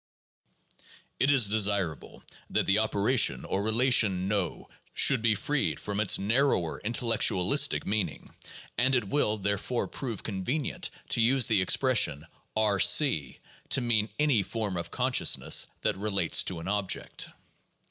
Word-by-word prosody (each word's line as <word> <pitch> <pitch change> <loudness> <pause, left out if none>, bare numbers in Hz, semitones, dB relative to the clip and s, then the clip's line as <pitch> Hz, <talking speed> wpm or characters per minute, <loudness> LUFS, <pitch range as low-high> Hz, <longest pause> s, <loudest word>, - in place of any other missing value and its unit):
It 135 - +2
is 135 -7 +5
desirable 100 -6 -2 0.3
that - - 0
the 95 +2 +2
operation 105 - +1
or 95 - -2
relation 110 -4 +2
"know" 100 -5 -3 0.3
should 135 -4 +4
be 115 -2 +2
freed 145 +8 -2
from 105 0 -4
its 105 -3 +3
narrower 105 - 0
intelleetualistic 115 -5 +1
meaning; 100 -6 -3 0.5
and 130 +2 +2
it 120 -5 -1
will, 110 -7 +1
therefore, 100 +4 -2
prove 115 -7 -6
convenient 115 +9 -3 0.2
to 120 - +2
use 125 +2 +3
the 105 -4 +1
expression 95 - +1 0.3
R 105 -2 +1
c, 80 - +3 0.3
to 130 - +2
mean 110 -3 0
any 145 -8 +2
form 105 0 -4
of 85 - -5
conscious - - +2
ness - - +2
that - - -1
relates 100 -4 +1
to 90 - -4
an 85 - -8
object. 100 -1 -2
105 Hz, 135 wpm, -28 LUFS, 95-120 Hz, 0.5 s, is